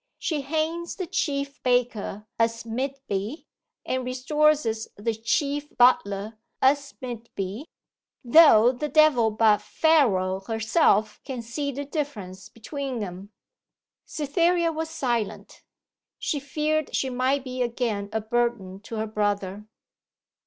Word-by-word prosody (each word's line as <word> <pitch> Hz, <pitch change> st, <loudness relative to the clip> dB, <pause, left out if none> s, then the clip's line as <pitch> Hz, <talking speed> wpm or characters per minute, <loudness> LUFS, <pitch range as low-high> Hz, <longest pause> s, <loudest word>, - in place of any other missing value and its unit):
She 310 Hz, -5 st, -2 dB
hangs 320 Hz, +4 st, -2 dB
the 375 Hz, -, -4 dB
chief 285 Hz, -6 st, -2 dB
baker, 245 Hz, -5 st, 0 dB
as 230 Hz, 0 st, 0 dB
mid 260 Hz, +4 st, -3 dB
be, 205 Hz, -, -3 dB, 0.4 s
and 255 Hz, 0 st, -1 dB
restores 295 Hz, +4 st, +2 dB, 0.3 s
the 225 Hz, +3 st, -1 dB
chief 285 Hz, +6 st, -2 dB
butler, 215 Hz, -3 st, +3 dB, 0.2 s
as 280 Hz, +1 st, +2 dB
mid 240 Hz, -2 st, -6 dB
be, 200 Hz, -, -4 dB, 0.6 s
though 245 Hz, -3 st, +7 dB
the 295 Hz, +4 st, -4 dB
devil 290 Hz, -6 st, +5 dB
but 215 Hz, -1 st, +3 dB
Pharaoh 200 Hz, -, +2 dB
herself 220 Hz, -, +1 dB
can 255 Hz, -4 st, -5 dB
see 280 Hz, +5 st, -3 dB
the 285 Hz, +2 st, -5 dB
difference 220 Hz, -, -5 dB
between 260 Hz, 0 st, -5 dB
'em.' 190 Hz, +2 st, -8 dB, 0.8 s
Cytherea 335 Hz, +3 st, +1 dB
was 320 Hz, 0 st, -4 dB
silent. 240 Hz, -8 st, -3 dB, 0.6 s
She 295 Hz, -, -2 dB
feared 305 Hz, +2 st, -1 dB
she 265 Hz, -, 0 dB
might 260 Hz, +2 st, +1 dB
be 255 Hz, -1 st, -5 dB
again 230 Hz, -4 st, -1 dB
a 220 Hz, 0 st, -1 dB
burden 220 Hz, -4 st, -1 dB
to 220 Hz, +2 st, -8 dB
her 220 Hz, 0 st, -1 dB
brother. 205 Hz, -1 st, -2 dB
250 Hz, 125 wpm, -25 LUFS, 215-290 Hz, 0.8 s, though